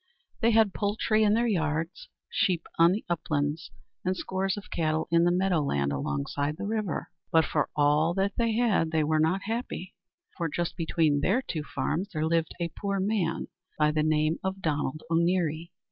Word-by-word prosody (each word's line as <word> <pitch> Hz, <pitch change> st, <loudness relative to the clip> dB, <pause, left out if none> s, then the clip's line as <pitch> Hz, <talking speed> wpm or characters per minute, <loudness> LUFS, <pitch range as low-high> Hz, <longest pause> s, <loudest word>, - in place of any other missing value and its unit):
They 230 Hz, -, +3 dB
had 220 Hz, -3 st, +4 dB
poultry 215 Hz, +1 st, +1 dB
in 210 Hz, 0 st, +4 dB
their 235 Hz, +1 st, +2 dB
yards, 165 Hz, -4 st, -1 dB, 0.2 s
sheep 180 Hz, -5 st, 0 dB
on 170 Hz, +1 st, +7 dB
the 205 Hz, +4 st, -2 dB
uplands, 155 Hz, -1 st, -1 dB, 0.3 s
and 185 Hz, 0 st, 0 dB
scores 190 Hz, +2 st, -1 dB
of 205 Hz, -, -9 dB
cattle 155 Hz, -1 st, 0 dB
in 170 Hz, 0 st, +4 dB
the 175 Hz, -, +4 dB
meadow 180 Hz, -2 st, +2 dB
land 70 Hz, -, 0 dB
alongside 70 Hz, -, -2 dB
the -, -, -4 dB
river. 215 Hz, -5 st, -2 dB, 0.2 s
But 160 Hz, -1 st, +5 dB
for -, -, 0 dB
all 150 Hz, +3 st, +3 dB
that 195 Hz, +1 st, +1 dB
they 220 Hz, -9 st, +2 dB
weren't 160 Hz, +5 st, +1 dB
happy. 220 Hz, -4 st, -4 dB, 0.4 s
For 170 Hz, -2 st, -1 dB
just 175 Hz, +3 st, -2 dB
between 160 Hz, -3 st, +1 dB
their 230 Hz, -, +2 dB
two 160 Hz, -10 st, -3 dB
farms 165 Hz, +5 st, -2 dB
there 155 Hz, -1 st, 0 dB
lived 165 Hz, 0 st, 0 dB
a 170 Hz, -1 st, -1 dB
poor 200 Hz, -1 st, -2 dB
man 190 Hz, -4 st, -1 dB, 0.3 s
by 150 Hz, 0 st, +3 dB
the 155 Hz, 0 st, +1 dB
name 155 Hz, +1 st, +1 dB
of 190 Hz, 0 st, -2 dB
Donald 155 Hz, -3 st, -2 dB
O'Neary. 170 Hz, -1 st, +1 dB
170 Hz, 170 wpm, -28 LUFS, 155-195 Hz, 0.4 s, on